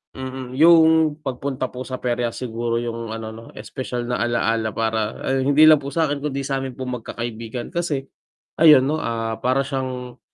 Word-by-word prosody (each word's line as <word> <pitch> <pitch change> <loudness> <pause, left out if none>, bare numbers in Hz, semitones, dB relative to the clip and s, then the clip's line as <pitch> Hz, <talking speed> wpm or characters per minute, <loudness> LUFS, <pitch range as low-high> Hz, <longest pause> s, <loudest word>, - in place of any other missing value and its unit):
mm 130 -1 -6
Yung 160 0 +5
pagpunta 135 -2 -3
po 125 +1 -7
sa 130 0 -6
perya 120 -1 -1
siguro 115 -1 -3
yung 115 -1 -5
ano 110 0 -5
no, 115 - -11
espesyal 120 +2 -5
na 125 -1 -1
ala-ala 115 -2 0
para 110 -1 -1
ay 135 0 +1
hindi 145 +3 +6
lang 155 -2 +6
po 140 - -5
sa'kin 145 -3 0
kundi 140 -2 -2
sa'min 135 -1 -2
po 130 - -4
magkakaibigan 115 -1 -5
kasi 150 -6 -2 0.5
ayan 155 -5 +8
no, 150 +4 0
ah, 115 -1 -3
para 130 +2 +1
siyang, 130 -2 -5
130 Hz, 170 wpm, -22 LUFS, 115-140 Hz, 0.5 s, ayan